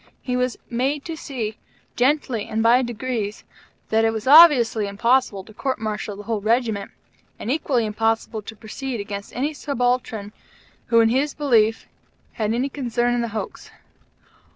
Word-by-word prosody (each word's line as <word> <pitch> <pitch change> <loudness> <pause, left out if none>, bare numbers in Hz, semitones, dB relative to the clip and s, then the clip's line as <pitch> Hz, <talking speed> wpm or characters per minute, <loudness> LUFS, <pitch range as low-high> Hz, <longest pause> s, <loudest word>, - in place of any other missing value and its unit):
He 250 -2 -2
was 250 -1 0
made 270 +4 -1
to 330 - -4
see, 240 -9 -5 0.4
gently 250 -4 +1
and 220 +1 -1
by 240 +3 +5
degrees, 235 -3 -3 0.5
that 220 0 +3
it 225 - +3
was 220 -1 -5
obviously 260 -8 +7
impossible 215 0 +1
to 215 - -15
court 265 +4 -2
martial 215 -1 -4
the 205 - -9
whole 220 -1 -2
Regiment, 220 -2 0 0.5
and 235 - -3
equally 265 -5 +1
impossible 225 +1 -1
to 220 +2 -9
proceed 235 +3 -6
against 200 0 -6
any 285 +5 -1
subaltern 245 -7 -2 0.5
who, 230 -1 +5
in 225 - +4
his 275 +5 0
belief, 225 -6 +2 0.5
had 215 -1 -1
any 245 +4 0
concern 245 -3 -1
in 240 - 0
the 235 - -1
hoax. 220 -1 -6
235 Hz, 155 wpm, -22 LUFS, 215-260 Hz, 0.5 s, obviously